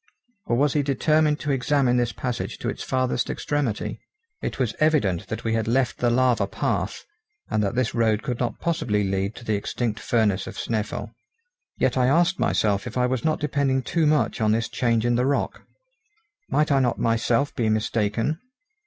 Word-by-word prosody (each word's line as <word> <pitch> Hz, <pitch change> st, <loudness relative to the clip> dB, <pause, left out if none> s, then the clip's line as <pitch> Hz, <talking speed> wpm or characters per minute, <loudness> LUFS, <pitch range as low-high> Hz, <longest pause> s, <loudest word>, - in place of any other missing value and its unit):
or 120 Hz, -, +2 dB
was 140 Hz, +3 st, +2 dB
he 150 Hz, -, +2 dB
determined 150 Hz, +2 st, +2 dB
to 145 Hz, -, -2 dB
examine 135 Hz, -1 st, +2 dB
this 120 Hz, -1 st, +1 dB
passage 125 Hz, +1 st, -4 dB
to -, -, -5 dB
its -, -, -3 dB
farthest 130 Hz, -2 st, 0 dB
extremity? 140 Hz, -8 st, -2 dB, 0.4 s
It -, -, -3 dB
was 125 Hz, -4 st, 0 dB
evident 145 Hz, -, +2 dB
that 110 Hz, -, -5 dB
we 115 Hz, -, 0 dB
had 110 Hz, -1 st, 0 dB
left 125 Hz, +2 st, +1 dB
the 120 Hz, -, +2 dB
lava 125 Hz, 0 st, +2 dB
path, -, -, -2 dB, 0.5 s
and 110 Hz, -, +2 dB
that 105 Hz, +3 st, -1 dB
this 125 Hz, -3 st, 0 dB
road 110 Hz, -2 st, +1 dB
could 125 Hz, -2 st, -3 dB
not 120 Hz, -3 st, -2 dB
possibly 115 Hz, -11 st, 0 dB
lead 95 Hz, +2 st, -1 dB
to 120 Hz, -, -11 dB
the 110 Hz, -, 0 dB
extinct 110 Hz, +2 st, -2 dB
furnace 105 Hz, -5 st, +1 dB
of -, -, -8 dB
Snæfell. 110 Hz, -2 st, -3 dB, 0.6 s
Yet -, -, +1 dB
I 125 Hz, -1 st, +3 dB
asked 175 Hz, +7 st, +3 dB
myself 105 Hz, +2 st, +1 dB
if 125 Hz, -, -6 dB
I 125 Hz, -, +3 dB
was 125 Hz, -1 st, -1 dB
not 155 Hz, -1 st, +1 dB
depending 140 Hz, -3 st, 0 dB
too 165 Hz, +1 st, +1 dB
much 150 Hz, -5 st, +1 dB
on 110 Hz, -1 st, +3 dB
this 115 Hz, 0 st, 0 dB
change 115 Hz, -2 st, +1 dB
in 120 Hz, 0 st, +2 dB
the 125 Hz, -, +2 dB
rock. 140 Hz, -, -1 dB, 0.9 s
Might 150 Hz, 0 st, +2 dB
I 135 Hz, -, +4 dB
not 125 Hz, -3 st, +1 dB
myself 115 Hz, +4 st, +1 dB
be 115 Hz, -2 st, +1 dB
mistaken? 110 Hz, +6 st, 0 dB
125 Hz, 190 wpm, -24 LUFS, 110-140 Hz, 0.9 s, I